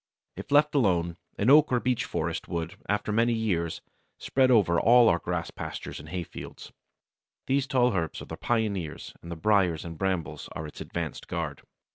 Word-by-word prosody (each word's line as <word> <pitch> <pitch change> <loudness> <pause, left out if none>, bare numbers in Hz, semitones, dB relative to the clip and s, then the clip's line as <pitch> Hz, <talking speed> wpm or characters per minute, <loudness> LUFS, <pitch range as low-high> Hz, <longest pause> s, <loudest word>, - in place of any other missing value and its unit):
If - - -9
left 150 +1 +5
alone, 90 - +2 0.2
an 110 +6 +3
oak 150 0 +6
or 125 - +3
beech 125 -1 0
forest - - -3
would, 85 0 -4
after 105 +1 0
many 115 +2 +3
years, 90 -8 -1 0.4
spread 130 -1 +2
over 95 -9 +4
all 120 +1 +6
our 85 - +2
grass 85 -1 -3
pastures - - -6
and 75 +2 -11
hay 90 +1 -3
fields. - - -10 0.7
These 135 0 +1
tall 125 -4 +3
herbs 85 -4 -2
are - - -8
the - - -7
pioneers, 100 -9 -2
and 85 - -9
the - - -3
briers 90 -3 +2
and 85 -2 -8
brambles 95 -6 -2
are 80 - -5
its 75 - -9
advanced - - -5
guard. 80 -5 -4
95 Hz, 180 wpm, -27 LUFS, 85-120 Hz, 0.7 s, oak